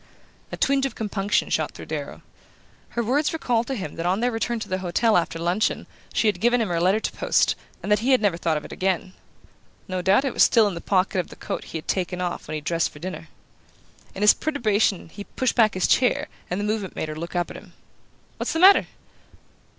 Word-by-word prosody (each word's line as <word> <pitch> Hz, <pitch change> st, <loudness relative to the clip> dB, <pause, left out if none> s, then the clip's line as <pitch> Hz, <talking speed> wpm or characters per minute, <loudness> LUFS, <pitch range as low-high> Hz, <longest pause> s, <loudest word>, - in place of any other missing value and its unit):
A -, -, -5 dB
twinge 275 Hz, 0 st, +2 dB
of -, -, -10 dB
compunction 205 Hz, -2 st, -1 dB
shot -, -, 0 dB
through -, -, -9 dB
Darrow. -, -, -6 dB, 0.7 s
Her 235 Hz, -, +2 dB
words 285 Hz, +8 st, +1 dB
recalled 240 Hz, -7 st, 0 dB
to 270 Hz, -, -2 dB
him 185 Hz, -, -6 dB
that 165 Hz, -, -3 dB
on 185 Hz, +3 st, +1 dB
their 245 Hz, +2 st, +1 dB
return 230 Hz, +1 st, -2 dB
to 215 Hz, -, -5 dB
the 185 Hz, -1 st, -2 dB
hotel 200 Hz, +5 st, +1 dB
after 170 Hz, -1 st, +1 dB
luncheon 175 Hz, +6 st, 0 dB, 0.3 s
she 225 Hz, -, +1 dB
had 210 Hz, -, 0 dB
given 240 Hz, +2 st, +3 dB
him 220 Hz, -4 st, 0 dB
her 170 Hz, -1 st, 0 dB
letter 190 Hz, +4 st, +3 dB
to -, -, -3 dB
post, -, -, +2 dB, 0.3 s
and -, -, -3 dB
that 210 Hz, -, +4 dB
he 240 Hz, +5 st, -1 dB
had 260 Hz, -2 st, +5 dB
never 205 Hz, -5 st, +1 dB
thought 165 Hz, -2 st, 0 dB
of 150 Hz, -, -6 dB
it -, -, -10 dB
again. 185 Hz, 0 st, -1 dB, 0.7 s
No 185 Hz, -2 st, -2 dB
doubt 195 Hz, +9 st, +3 dB
it 270 Hz, -, -1 dB
was -, -, 0 dB
still 225 Hz, -2 st, +6 dB
in 200 Hz, -, -2 dB
the 170 Hz, -, -6 dB
pocket 190 Hz, -1 st, +1 dB
of 180 Hz, -, -2 dB
the -, -, -12 dB
coat -, -, -5 dB
he -, -, -6 dB
had 155 Hz, -, -9 dB
taken 180 Hz, -1 st, -1 dB
off 175 Hz, -1 st, -3 dB
when 155 Hz, -, -4 dB
he 155 Hz, -, -4 dB
dressed 165 Hz, +2 st, 0 dB
for -, -, -15 dB
dinner. 185 Hz, +5 st, -7 dB, 0.9 s
In 195 Hz, -, -2 dB
his 210 Hz, -, +8 dB
perturbation 215 Hz, -, 0 dB
he 205 Hz, +5 st, -8 dB
pushed 255 Hz, +4 st, -1 dB
back 220 Hz, -4 st, +3 dB
his 185 Hz, -, +1 dB
chair, 250 Hz, -1 st, +2 dB, 0.2 s
and 180 Hz, -, -2 dB
the -, -, -2 dB
movement 210 Hz, -3 st, -2 dB
made 155 Hz, -, -3 dB
her 155 Hz, -, -5 dB
look 170 Hz, +3 st, -7 dB
up 175 Hz, 0 st, -1 dB
at -, -, -8 dB
him. -, -, -15 dB, 0.6 s
"What's -, -, -2 dB
the 325 Hz, -, -1 dB
matter?" 385 Hz, +3 st, +7 dB
200 Hz, 235 wpm, -24 LUFS, 175-230 Hz, 0.9 s, his